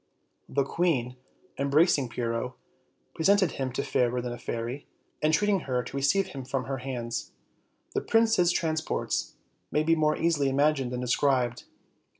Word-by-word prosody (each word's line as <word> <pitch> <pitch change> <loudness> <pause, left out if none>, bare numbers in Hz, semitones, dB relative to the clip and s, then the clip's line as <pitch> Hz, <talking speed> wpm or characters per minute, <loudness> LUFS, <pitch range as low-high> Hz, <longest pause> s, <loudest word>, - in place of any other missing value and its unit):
The 140 +1 +1
queen, 135 -5 0 0.4
embracing 140 -1 +3
Pyrrho, 115 +1 -3 0.6
presented 190 +1 +3
him 130 -1 -3
to - - -1
Fairer 125 0 +1
than 120 0 -4
a - - -6
Fairy, 120 +3 -4 0.3
entreating 195 +6 +3
her 125 -1 +1
to - - -9
receive 180 +8 +2
him 135 -6 -7
from 130 0 -2
her 135 0 -4
hands. 120 -3 -4 0.6
The - - 0
prince's 225 -6 +3
transports 160 -2 -1 0.3
may 150 - +1
be 165 +1 +3
more 155 -1 +2
easily 155 -5 +2
imagined 140 -2 +2
than 125 0 -3
described. 125 -1 +1
140 Hz, 145 wpm, -28 LUFS, 125-160 Hz, 0.6 s, embracing